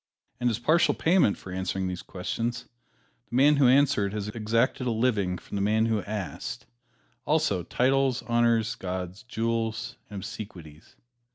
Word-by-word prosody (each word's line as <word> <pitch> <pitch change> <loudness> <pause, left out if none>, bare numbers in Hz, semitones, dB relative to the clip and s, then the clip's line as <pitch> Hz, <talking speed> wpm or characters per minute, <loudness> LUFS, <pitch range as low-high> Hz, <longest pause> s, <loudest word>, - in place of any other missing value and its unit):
And 125 - +2
as 110 - -1
partial 160 +8 +3
payment 165 - +3
for 90 - -10
answering 95 +1 -2
these 90 -1 -4
questions, 115 +6 -4 0.6
the - - -5
man 145 +3 +5
who 140 -3 +5
answered 130 -6 +3
has 105 -1 -3
exacted 115 +4 0
a - - +2
living 110 -6 +1
from 100 - -7
the - - -1
man 110 +2 +2
who 110 -2 +1
asked, 105 -3 -5 0.6
also 95 -3 +1
titles, 130 +6 +1
honors, 115 -1 +2
gauds, 95 -3 -5
jewels 115 -2 -2
and 100 -2 -6
obsequies. 90 -8 -9
110 Hz, 150 wpm, -27 LUFS, 100-125 Hz, 0.6 s, man